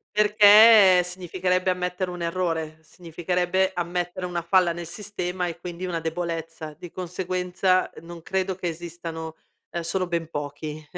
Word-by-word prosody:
Perché 210 -2 +7
significherebbe 185 +1 -1
ammettere 180 0 -2
un 175 -1 -7
errore, 165 -3 -2
significherebbe 180 +3 -1
ammettere 175 +1 -3
una 175 -1 -3
falla 170 0 +3
nel 170 -1 -7
sistema 180 -2 -4
e 170 -1 -6
quindi 175 +1 -6
una 175 -2 -2
debolezza. 165 -1 -5
Di 175 +1 -9
conseguenza 185 +1 -1
non 170 0 -10
credo 190 0 -1
che 180 -1 -4
esistano, 165 -1 -6 0.3
ehm 170 - -4
sono 185 +2 -1
ben 170 -2 -2
pochi 150 +1 -6
180 Hz, 135 wpm, -24 LUFS, 165-185 Hz, 0.3 s, Perché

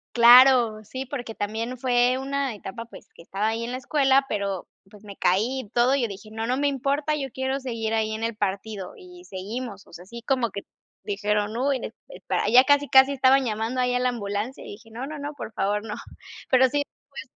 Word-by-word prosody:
Claro. 240 -2 +7
Sí, 260 +5 -6
porque 245 -4 -6
también 225 +4 -3
fue 245 0 +2
una 270 -2 -2
etapa, 210 +3 -8
pues, 235 - -14
que - - -15
estaba 195 +5 -2
ahí 225 +1 -2
en 235 - -4
la 255 - -3
escuela, 270 0 +2
pero 200 -4 -3 0.2
pues, 210 0 -17
me 200 -1 -10
caí 220 +11 +1
y - - -20
todo, 240 +3 +2
y 280 - 0
yo 235 - +1
dije: 200 +1 -10
"No, 225 +1 -4
no 250 +1 0
me 285 +1 +1
importa, 285 +2 0
yo 275 -2 -4
quiero 265 +2 -2
seguir 230 -4 -3
ahí 220 -1 0
en 220 - -5
el 230 -1 -2
partido, 200 -1 -4
y 360 -1 -14
seguimos", 205 - -6
o - - -20
sea, 175 +2 -11
sí 235 +4 -10
como 255 -3 +1
que 200 - -6 0.4
dijeron: 210 +1 -1
"Uy, 270 +2 +1
es - - -6
espera". - - -2
Ya 250 +3 +7
casi, 285 +1 +3
casi 265 +1 +6
estaban 265 0 +4
llamando 225 +3 -2
ahí, 250 0 +1
a 250 - +1
la 250 0 +1
ambulancia 210 +1 -4
y - - -10
dije: 225 +3 -13
"No, 240 +4 -5
no, 300 +1 -7
no, 290 +1 -5
por 225 -5 -8
favor, 205 +1 -1
no". 210 - -5 0.6
Pero 260 0 +5
sí, 290 +2 0 0.3
pues 280 - -8
240 Hz, 225 wpm, -25 LUFS, 215-265 Hz, 0.6 s, Claro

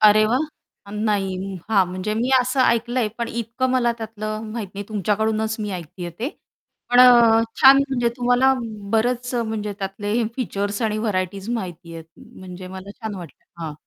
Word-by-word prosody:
अरे 215 0 +6
वाह. 245 +4 +2 0.5
नाही 195 -3 -1 0.2
हां, 195 -3 +5
म्हणजे 185 +4 -3
मी 240 +4 0
असं 255 +2 0
ऐकलंय 240 -1 +2
पण 235 - -2
इतकं 235 +3 -2
मला 240 -2 +2
त्यातलं 215 -1 -5
माहीत 220 -4 -4
नाही 200 +1 -5
तुमच्याकडूनच 220 +1 0
मी 210 -1 -3
ऐकतीये 175 0 -6
ते. 250 +5 -1 0.6
पण 245 - +6
अ, 235 -2 +7 0.2
छान 270 +1 +9
म्हणजे 245 -3 +1
तुम्हाला 245 +1 +3 0.4
बरच 245 +2 +1
म्हणजे 220 -3 -2
त्यातले 205 +1 -3 0.2
फीचर्स 205 -4 -2
आणि 215 -1 0
व्हरायटीज 195 -1 -2
माहिती 175 -7 -5
आहे. 165 - -7 0.4
म्हणजे 185 0 -9
मला 190 +1 -9
छान 220 -2 -4
वाटल. 175 -7 -10 0.2
हां. 155 -2 -4
215 Hz, 155 wpm, -22 LUFS, 195-235 Hz, 0.6 s, छान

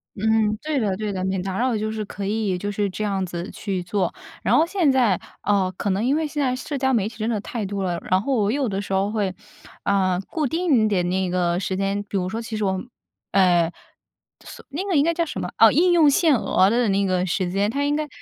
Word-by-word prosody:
嗯， 220 0 +2
对 305 -1 -2
的 205 -5 0
对 210 +1 -3
的， 185 -2 -3
免 190 -1 -1
打 190 0 -3
扰 250 0 +1
就 215 0 -2
是 215 -1 -4
可 200 - -7
以 205 -1 0
就 205 +3 -3
是 205 0 0
这 200 +4 -4
样 195 -2 -1
子 175 +1 -5
去 195 -3 -4
做。 180 +1 -1 0.3
然 - - +3
后 - - +5
现 340 -4 +2
在 245 -8 +3 0.2
呃， 195 -2 +1
可 205 - -2
能 195 +4 0
因 270 +3 +2
为 315 0 0
现 295 0 -3
在 255 -1 +1
社 275 +3 -4
交 265 0 +1
媒 210 -4 +2
体 220 - -15
真 220 0 -2
的 220 -3 -1
太 220 0 -4
多 195 0 -3
了， 175 -2 -1
然 185 +1 +4
后 270 +5 0
我 210 -3 +1
有 270 -1 0
的 195 -1 -2
时 200 -1 -4
候 195 +1 +1
会， 205 -4 -1 0.5
呃， 185 -2 +2
固 310 -2 -1
定 280 -6 +2
的 200 -4 +1
那 180 +1 -1
个 175 -1 +1
时 190 0 -2
间 195 +1 -1
比 205 - -6
如 185 -1 0
说 220 - -3
其 225 0 -5
实 215 - -2
我 190 -1 +1
们 190 +6 -5 0.4
呃， 175 -3 +4 0.7
锁 - - -11
那 300 +7 -3
个 385 - 0
应 285 - +5
该 335 +2 +2
叫 335 0 +1
什 300 - -5
么 - - -3
哦， 225 -1 +7
应 350 +6 +4
用 330 -3 +5
限 315 -1 +4
额 190 -4 +3
的 235 +2 +2
那 200 0 +2
个 185 -1 +1
时 185 0 -1
间， 200 +2 +1
它 280 +3 -1
应 290 +1 +1
该 305 0 -2
205 Hz, 275 characters per minute, -23 LUFS, 190-255 Hz, 0.7 s, 哦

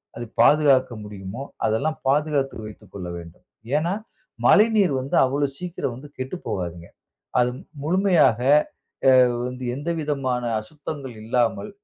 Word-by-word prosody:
அதை 120 - -5 0.2
பாதுகாக்க 135 -2 +5
முடியுமோ, 105 +3 -7 0.2
அதெல்லாம் 140 +9 0
பாதுகாத்து 145 -1 +1
வைத்துக் 105 -2 -13
கொள்ள 90 -3 -6
வேண்டும். 85 0 -12 0.3
ஏன்னா, 160 +4 +1 0.5
மழைநீர் 210 - +5
வந்து 135 - -3
அவ்ளோ 140 +2 0
சீக்கிரம் 175 -8 -4
வந்து 140 +4 -11
கெட்டு 130 +5 -4
போகாதுங்க. 85 -2 -4 0.5
அது 125 0 +3 0.3
முழுமையாக 175 - +3 0.7
எ - - +8 0.4
வந்து 125 0 -7
எந்த 145 +5 -4
விதமான 135 -5 -1 0.2
அசுத்தங்கள் 140 +1 -7
இல்லாமல் 120 - 0
135 Hz, 120 wpm, -23 LUFS, 115-150 Hz, 0.7 s, எ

